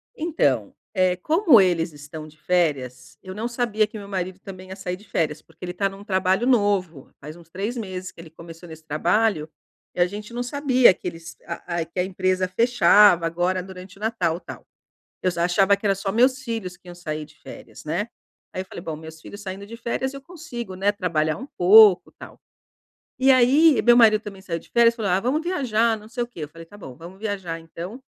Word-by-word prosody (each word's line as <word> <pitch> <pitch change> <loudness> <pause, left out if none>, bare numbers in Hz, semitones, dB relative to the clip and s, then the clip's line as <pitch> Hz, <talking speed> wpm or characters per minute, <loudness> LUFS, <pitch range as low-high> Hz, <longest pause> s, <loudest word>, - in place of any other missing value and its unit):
Então, 325 +1 0 0.2
eh, 185 -2 +2
como 310 - +4
eles 170 -3 +1
estão 150 +2 -9
de 155 0 -18
férias 145 -7 -1
eu 185 - -9
não 220 +3 -3
sabia 235 -3 0
que 210 - -14
o - - -7
meu 200 - -10
marido 185 -1 -4
também 185 -1 -11
ia 190 - -7
sair 180 -2 -4
de 205 +4 -18
férias, 155 -1 -1
porque - - -18
ele 180 0 -4
tá 195 +2 0
num 195 +1 -12
trabalho 190 +2 +1
novo. 200 - +1
Faz 150 +2 -9
uns 170 -1 -17
3 200 +8 -4
meses 185 -4 -6
que - - -20
ele 165 -1 -11
começou 165 +2 -12
nesse 160 -1 -12
trabalho 170 +2 +1 0.5
e - - -7
a 175 - +5
gente 210 +4 -9
não 245 +1 -2
sabia 255 -3 +4
que - - -8
eles 165 0 -8
ah 170 - -6 0.2
ah 165 - -1
que 170 +3 -7
a - - +3
empresa 185 0 0
fechava 205 -3 +5
agora 175 +3 0
durante 185 0 -11
o - - -17
Natal, 180 -7 -1
tal. 175 - -11 0.6
Eu 185 - +1
s 175 - -5
achava 190 +3 +3
que 205 - -11
era 200 -1 +3
só 195 0 -3
meus 255 +5 +3
filhos 225 -7 -5
que 180 - -22
iam 175 - -9
sair 155 -3 -5
de 150 0 -21
férias, - - -12
né? 170 +8 -2 0.5
Aí 185 - -3
eu - - -8
falei: 185 - -9
"Bom, 160 -3 -4
meus 160 +1 -11
filhos 205 +5 -10
saindo 195 0 -7
de 225 +3 -9
férias 260 +3 -3
eu 275 - -9
consigo, 270 - -8
né? 195 +2 +1
Trabalhar 160 -6 -1
um 265 - -8
pouco, 200 +1 +7
tal". - - -12 0.8
E 265 +1 +5
aí, 270 +4 +5
meu 240 0 +6
marido 220 -3 +6
também 200 -3 -10
saiu 170 -3 -4
de - - -21
férias 235 0 +4
falou: 215 -5 -2
"Ah, 180 - +3
vamos 260 +9 0
viajar, 235 -10 0
não 210 0 -14
sei 240 +1 -2
o - - -7
quê", 235 -9 -11
eu 150 - -7
falei: 165 +1 -12
"Tá 205 +5 -15
bom, 135 -10 -10
vamos 175 +6 -12
viajar, 190 -6 -4
então." 170 +8 -9
190 Hz, 225 wpm, -23 LUFS, 170-225 Hz, 0.8 s, pouco